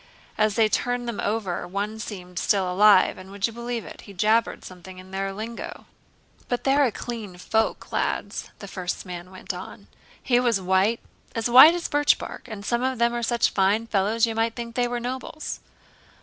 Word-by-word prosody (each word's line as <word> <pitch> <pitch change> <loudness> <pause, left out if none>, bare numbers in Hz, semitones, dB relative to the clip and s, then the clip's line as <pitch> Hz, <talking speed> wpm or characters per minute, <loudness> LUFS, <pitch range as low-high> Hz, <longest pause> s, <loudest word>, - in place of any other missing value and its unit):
"As 215 -1 +2
they 225 -1 +4
turned 245 +2 -1
them 235 -3 -4
over 200 -5 -2
one 205 +4 -3
seemed 180 -5 -6
still 190 -3 +1
alive 205 -1 +5
and, 185 +1 -11
would 200 0 -2
you 230 - -3
believe 235 -1 -4
it, - - -10
he 200 - -12
jabbered 215 +5 +1
something 185 0 -11
in 185 +1 -12
their 195 0 -2
lingo." 220 +4 -7 0.6
"But 245 - -2
they're 275 +1 +4
a 245 - +1
clean 215 -6 -6
folk, 220 +5 -1
lads," - - -2
the 200 - -9
first 185 -1 -4
man 180 -1 -7
went 185 0 -6
on; - - -9 0.4
"he 245 -2 +3
was 240 -5 +2
white—as 205 +4 -1
white 295 +7 +10
as 350 - -3
birchbark—and 250 -7 -1
some 235 +2 0
of 260 0 0
them 235 +1 +2
are 240 - -2
such 235 0 +1
fine 200 +3 +2
fellows, 215 +2 +2
you 225 - -3
might 225 +1 0
think 235 -1 -6
they 245 0 +1
were 240 0 -2
nobles." 260 +5 -5
220 Hz, 185 wpm, -25 LUFS, 195-240 Hz, 0.6 s, white